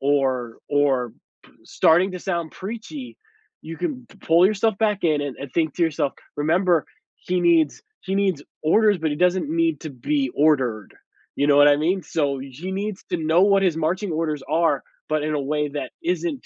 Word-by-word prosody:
or 130 -4 0
or 135 -5 +1 0.3
p - - -21
starting 180 +4 +3
to 180 - -6
sound 170 -4 -3
preachy, 235 +7 -8 0.5
you 165 +1 -7
can 265 -7 -4
p - - -19
pull 170 +3 +4
yourself 215 +1 +1
back 210 -2 +1
in 155 -3 +2
and 140 -3 -5
and 140 -2 -8
think 160 -3 0
to 175 - -3
yourself, 145 -3 0 0.2
"Remember, 170 +2 +2 0.3
he 180 0 -2
needs 165 -4 +3 0.2
he 190 - -4
needs 190 -7 0 0.2
orders, 205 +4 +3
but 160 -1 0
he 145 - -2
doesn't 180 +9 +1
need 330 0 +1
to 155 - -6
be 135 +1 -1
ordered." 130 -8 +1 0.4
You 145 - +1
know 145 -1 +5
what 145 0 +7
I 145 - +5
mean? 175 +5 0
So, 145 -4 -1
y 135 +1 -8
he 175 +9 -7
needs 200 +1 -4
to 175 - +1
know 160 +2 +2
what 195 0 +4
his 180 -4 +2
marching 175 +5 -1
orders 155 -3 -2
are, 155 -2 +1 0.3
but 155 -1 0
in 155 - -1
a 145 - 0
way 150 +1 -1
that 145 +1 -5
isn't 340 -4 -2
160 Hz, 195 wpm, -23 LUFS, 145-190 Hz, 0.5 s, what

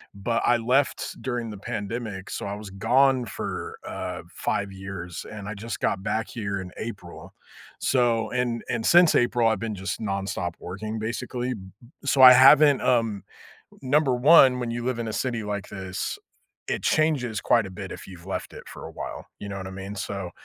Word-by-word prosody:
but, 115 +4 -1
I 120 - +4
left 125 +5 0
during 120 -3 -3
the 105 - -8
pandemic, 105 -1 -5
so, - - -4
I 100 - -3
was 105 -1 -8
gone 125 +6 +3
for, 110 - -5
uh, - - -5
5 100 -1 -1
years, 95 -3 -7
and 105 -2 -7
I 105 - -4
just 110 +3 -6
got 95 - 0
back 110 +1 -1
here 100 -4 -3
in 90 -1 -8
April, 100 -6 -8 0.5
so 115 -4 +1
and 125 -2 -1
and 115 -2 -1
since 175 -1 +6
April, 120 -1 +3
I've 110 -3 +1
been 110 0 -3
just 95 0 -4
nonstop 100 -3 -2
working, 105 +5 -5
basically, 125 +2 -3
b 105 - -8 0.2
b 120 - -16 0.2
so, 135 0 +3
I 125 0 +12
haven't 140 +2 +7
um, 115 -5 +1 0.6
number 135 0 +3
1, 130 -1 +7
when 120 -2 -3
you 120 0 -3
live 125 -1 -1
in 115 - -3
a 110 - -4
city 120 -4 -2
like 105 -1 -4
this, 95 -2 -4 0.5
it - - -2
changes 140 -9 +1
quite 115 -3 +3
a - - -10
bit 90 - -7
if - - -9
you've 90 -2 -12
left 95 - -5
it - - -10
for - - -9
a - - -8
while, - - -7
you 105 - -7
know 100 - -5
what 95 -1 -6
I - - -7
mean, 95 +2 -7
so 100 -4 -4
110 Hz, 195 wpm, -25 LUFS, 100-125 Hz, 0.6 s, I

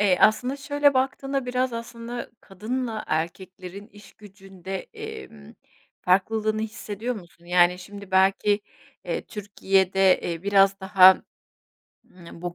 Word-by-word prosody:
Eee, 195 -3 +4
aslında, 250 +5 +3
şöyle 285 0 +2
baktığında 270 0 -1
biraz 250 0 -1
aslında 235 +1 -7
kadınla 220 +3 -4
erkeklerin 185 +4 -5
işgücünde, 195 -3 -10 0.2
emm, 430 - -10 0.5
farklılığını 215 +4 +1
hissediyor 220 +2 -5
musun? 175 -4 -13
Yani, 175 0 +3
şimdi, 200 +2 -11
belki, 195 +2 +3 0.4
eee, - - -3
Türkiye'de, 195 -2 +1
eee, 170 -1 -4
biraz 195 0 +3
daha, 190 -1 +6 0.9
ımm, 170 -1 -14
bu 175 -1 -4
205 Hz, 110 wpm, -24 LUFS, 190-230 Hz, 0.9 s, daha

